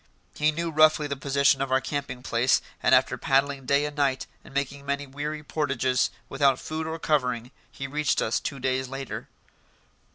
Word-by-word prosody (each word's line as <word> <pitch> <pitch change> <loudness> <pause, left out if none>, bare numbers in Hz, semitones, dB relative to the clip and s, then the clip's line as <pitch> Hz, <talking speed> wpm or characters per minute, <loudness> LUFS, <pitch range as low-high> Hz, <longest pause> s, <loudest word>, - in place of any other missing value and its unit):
He 150 +1 +2
knew 165 +2 -3
roughly 155 0 +5
the 140 -1 -2
position 140 0 +2
of 135 -1 -2
our 130 - +4
camping 135 -2 -4
place, 125 +1 +3 0.2
and - - +5
after - - +2
paddling 135 -1 +1
day 140 +1 +3
and 150 0 -5
night, 135 -3 +1 0.2
and - - -14
making 140 0 -2
many 140 +1 -2
weary 150 +3 -5
portages, 135 -5 0 0.2
without 135 -1 +3
food 160 +2 -4
or 160 0 -3
covering, 125 -6 0 0.2
he 135 - -6
reached 145 -1 0
us 110 - +1
two 140 - -5
days 130 0 0
later. 135 0 -6
140 Hz, 175 wpm, -26 LUFS, 130-150 Hz, 0.2 s, roughly